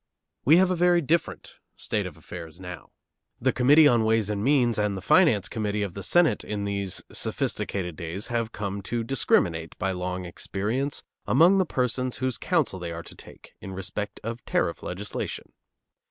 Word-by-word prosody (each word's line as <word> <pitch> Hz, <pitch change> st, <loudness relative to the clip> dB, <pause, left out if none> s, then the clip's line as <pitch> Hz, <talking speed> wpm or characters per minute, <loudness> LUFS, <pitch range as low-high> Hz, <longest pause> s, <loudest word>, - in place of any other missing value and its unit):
We 155 Hz, +5 st, +7 dB
have 185 Hz, 0 st, +4 dB
a -, -, +1 dB
very 175 Hz, 0 st, +4 dB
different 165 Hz, +2 st, -1 dB, 0.2 s
state -, -, -2 dB
of -, -, -11 dB
affairs 85 Hz, -1 st, -9 dB
now. 90 Hz, -1 st, -9 dB, 0.5 s
The 130 Hz, +2 st, +1 dB
Committee 145 Hz, +5 st, +6 dB
on 120 Hz, -4 st, +4 dB
Ways 110 Hz, -1 st, +2 dB
and 100 Hz, -1 st, -2 dB
Means 125 Hz, -4 st, +3 dB
and 105 Hz, -2 st, 0 dB
the -, -, -6 dB
Finance 155 Hz, -, +4 dB
Committee 105 Hz, -2 st, -2 dB
of 100 Hz, -4 st, -4 dB
the 100 Hz, -, -6 dB
Senate 175 Hz, -, +3 dB
in 105 Hz, -1 st, -3 dB
these 100 Hz, -2 st, -2 dB
sophisticated 90 Hz, -5 st, -2 dB
days 85 Hz, +5 st, -5 dB
have 115 Hz, -1 st, -1 dB
come 100 Hz, -2 st, -4 dB
to 115 Hz, +4 st, -2 dB
discriminate 85 Hz, -9 st, +1 dB
by 95 Hz, -, -1 dB
long 90 Hz, 0 st, -3 dB
experience 110 Hz, +10 st, -2 dB, 0.2 s
among 185 Hz, +4 st, +5 dB
the 185 Hz, -, +2 dB
persons 125 Hz, -1 st, -1 dB
whose 130 Hz, -2 st, -2 dB
counsel 155 Hz, -, 0 dB
they 85 Hz, -1 st, -5 dB
are 85 Hz, 0 st, -6 dB
to -, -, -12 dB
take -, -, -14 dB
in 95 Hz, -, -7 dB
respect 95 Hz, +2 st, -5 dB
of 115 Hz, +1 st, -5 dB
tariff -, -, 0 dB
legislation. 100 Hz, +4 st, -5 dB
105 Hz, 175 wpm, -26 LUFS, 95-130 Hz, 0.5 s, We